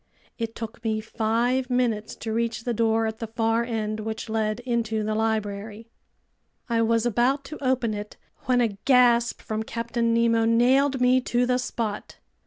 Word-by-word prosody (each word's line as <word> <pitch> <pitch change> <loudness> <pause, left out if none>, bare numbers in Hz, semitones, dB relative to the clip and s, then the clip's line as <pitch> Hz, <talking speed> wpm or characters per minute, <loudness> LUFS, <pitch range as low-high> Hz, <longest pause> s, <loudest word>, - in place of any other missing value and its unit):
It 230 -1 -3
took 225 +1 -7
me 220 -1 0
five 235 +4 0
minutes 235 -4 0
to 220 -1 -5
reach 230 0 -1
the 240 - -1
door 225 0 +2
at 220 +1 -4
the 225 - -4
far 225 +1 0
end, 220 -2 -3
which 220 +1 -5
led 220 0 -1
into 230 -3 -1
the 215 +1 -1
library. 215 0 -2 0.8
I 230 -2 +1
was 230 0 +2
about 245 +5 +1
to 300 +1 -8
open 255 -4 +1
it 210 0 -7 0.3
when 250 -1 +3
a 215 -4 0
gasp 245 -3 +4
from 215 0 -3
Captain 230 +1 -2
Nemo 230 0 +3
nailed 260 +4 +3
me 250 +1 +4
to 245 +1 +1
the 250 0 +1
spot. 225 -4 -4
230 Hz, 170 wpm, -25 LUFS, 220-245 Hz, 0.8 s, gasp